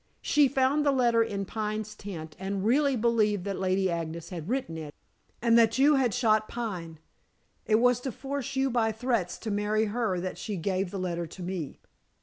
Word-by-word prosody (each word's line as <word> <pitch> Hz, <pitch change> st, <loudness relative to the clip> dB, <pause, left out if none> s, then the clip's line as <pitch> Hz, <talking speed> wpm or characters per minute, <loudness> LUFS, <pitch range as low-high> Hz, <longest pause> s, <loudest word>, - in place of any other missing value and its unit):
She 295 Hz, -1 st, +4 dB
found 270 Hz, +2 st, +2 dB
the 285 Hz, -, +3 dB
letter 240 Hz, -3 st, +3 dB
in 200 Hz, -3 st, -1 dB
Pine's 215 Hz, +1 st, -3 dB
tent, 165 Hz, -7 st, -8 dB
and 195 Hz, +1 st, -3 dB
really 275 Hz, +4 st, +3 dB
believed 215 Hz, -4 st, +2 dB
that 200 Hz, -1 st, -3 dB
Lady 190 Hz, 0 st, +1 dB
Agnes 170 Hz, -1 st, -4 dB
had 175 Hz, -1 st, -6 dB
written 250 Hz, -10 st, -2 dB
it, 155 Hz, -2 st, -7 dB, 0.5 s
and 235 Hz, -1 st, +5 dB
that 225 Hz, 0 st, +4 dB
you 285 Hz, +3 st, +5 dB
had 265 Hz, -4 st, +3 dB
shot 215 Hz, -2 st, +2 dB
Pine. 180 Hz, -9 st, -5 dB, 0.7 s
It 215 Hz, -, +4 dB
was 245 Hz, +2 st, +4 dB
to 260 Hz, +1 st, -4 dB
force 275 Hz, +1 st, -5 dB
you 265 Hz, 0 st, +1 dB
by 225 Hz, -2 st, +2 dB
threats 220 Hz, -5 st, -1 dB
to 220 Hz, -, -5 dB
marry 210 Hz, +2 st, +1 dB
her 220 Hz, -7 st, 0 dB
that 185 Hz, +1 st, -5 dB
she 210 Hz, -, -4 dB
gave 185 Hz, +2 st, -1 dB
the 195 Hz, -, -5 dB
letter 175 Hz, -2 st, -2 dB
to 180 Hz, +3 st, -9 dB
me." 175 Hz, -5 st, -4 dB
215 Hz, 190 wpm, -28 LUFS, 185-245 Hz, 0.7 s, and